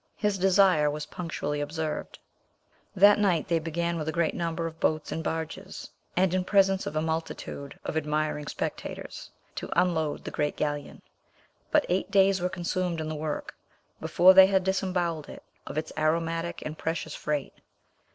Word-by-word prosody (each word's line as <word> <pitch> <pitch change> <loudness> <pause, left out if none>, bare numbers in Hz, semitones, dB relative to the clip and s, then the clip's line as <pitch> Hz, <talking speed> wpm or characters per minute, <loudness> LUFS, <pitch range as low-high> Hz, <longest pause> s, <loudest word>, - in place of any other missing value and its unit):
His 210 -2 0
desire 185 -5 +4
was 150 +1 -4
punctually 150 -4 -4
observed. 155 +1 -4 0.8
That 205 +2 +7
night 185 -6 +2
they 170 -1 +2
began 170 +1 -2
with 155 - -4
a - - +1
great 170 0 +1
number 165 -1 -2
of 165 0 -6
boats 155 -1 0
and 160 - -3
barges, 160 0 -5 0.3
and 185 -1 +3
in 185 0 +1
presence 195 0 +3
of 155 - -5
a 155 - +1
multitude 160 -3 -4
of - - -3
admiring 150 -1 -1
spectators, - - -5 0.2
to - - -6
unload 160 -4 0
the - - -6
great 150 0 -1
galleon, 145 -1 -3 0.7
but - - +3
eight 185 +3 0
days 195 -1 +4
were 180 - 0
consumed 180 -1 -2
in 155 0 -3
the 155 - -3
work 150 0 -4 0.5
before 185 +2 +6
they 190 0 +9
had 190 -1 +2
disembowelled 180 -4 -1
it - - -10 0.2
of 145 - -6
its 155 +1 -3
aromatic 165 +2 -1
and 155 0 -6
precious 160 -1 -3
freight. 150 -2 -3
165 Hz, 165 wpm, -28 LUFS, 155-185 Hz, 0.8 s, they